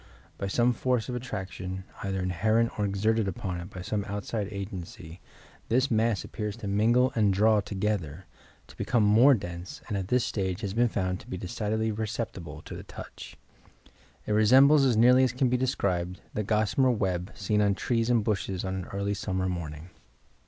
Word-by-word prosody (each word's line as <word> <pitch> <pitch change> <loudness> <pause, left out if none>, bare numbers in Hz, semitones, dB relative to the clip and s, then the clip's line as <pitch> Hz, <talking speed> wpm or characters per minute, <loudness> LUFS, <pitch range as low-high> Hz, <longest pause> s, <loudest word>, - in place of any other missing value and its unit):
By 100 - -2
some 120 +5 +2
force 125 -2 0
of 125 - -3
attraction, 95 -6 -5 0.2
either 95 -1 -2
inherent 110 +6 +1
or 105 - +2
exerted 105 +2 +1
upon 90 -1 -4
it 85 +2 -8
by 95 -3 -8
some 100 +2 -2
outside 105 0 -3
agency, 95 -4 -7 0.5
this 130 +4 +2
mass 110 -2 +2
appears 105 -1 -5
to 110 - -6
mingle 115 +6 +3
and 105 -3 +3
draw 105 +3 +4
together, 95 -5 -3 0.4
to - - -16
become 120 -4 +1
more 115 +7 +6
dense 85 -3 -7
and 105 - -3
at 95 -2 -2
this 125 +2 +2
stage 95 -1 -2
has 100 -3 -3
been 120 +2 +3
found 95 -3 -1
to - - -15
be 95 - -5
decidedly 110 +4 -2
perceptible 105 -8 -5
to - - -8
the - - -7
touch. - - -10 0.9
It - - -3
resembles 135 +7 +6
as 125 -4 +3
nearly 125 +3 +6
as 130 -2 +1
can 125 0 +1
be 125 - +2
described 90 -8 -1
the 105 - -1
gossamer 110 +5 +2
web, 95 -4 -1
seen 105 +2 0
on 100 -1 +2
trees 115 +2 0
and 120 -3 +3
bushes 100 -3 -2
on 95 - -2
an 95 -2 -4
early 100 +1 -2
summer 95 -2 -2
morning." 85 -1 -5
105 Hz, 180 wpm, -28 LUFS, 95-115 Hz, 0.9 s, more